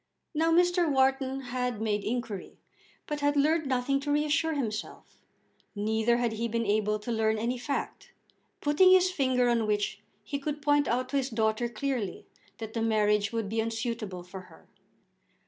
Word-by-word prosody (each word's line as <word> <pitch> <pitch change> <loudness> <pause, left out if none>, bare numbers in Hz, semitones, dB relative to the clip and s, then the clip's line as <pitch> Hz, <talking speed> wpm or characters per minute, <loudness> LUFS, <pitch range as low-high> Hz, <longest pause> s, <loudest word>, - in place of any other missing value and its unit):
Now 325 +2 +2
Mr. 350 0 +3
Wharton 265 0 +1
had 250 -2 -3
made 210 -2 -1
inquiry, 230 -4 -4 0.5
but 295 -1 -3
had 290 0 +1
learned 310 +1 +2
nothing 265 +1 +1
to 290 +1 -3
reassure 300 +2 +1
himself; 220 -6 -5 0.6
neither 220 +3 +1
had 240 -2 0
he 230 +2 -2
been 230 0 -1
able 210 0 +1
to 215 +3 -6
learn 220 -1 +1
any 240 +3 -2
fact, 275 +3 -4 0.5
putting 300 +6 +5
his 370 0 +5
finger 260 -6 +2
on 230 -2 +1
which 205 -1 -1 0.2
he 280 +7 -4
could 295 +1 -3
point 290 0 +2
out 255 +2 0
to 280 - 0
his 270 -1 0
daughter 220 0 0
clearly 235 -4 -3 0.3
that 220 -1 -7
the 230 - -2
marriage 210 -2 +2
would 225 -3 -2
be 225 +2 -2
unsuitable 225 -5 -4
for 185 +1 -9
her. - - -18
240 Hz, 165 wpm, -29 LUFS, 220-280 Hz, 0.6 s, putting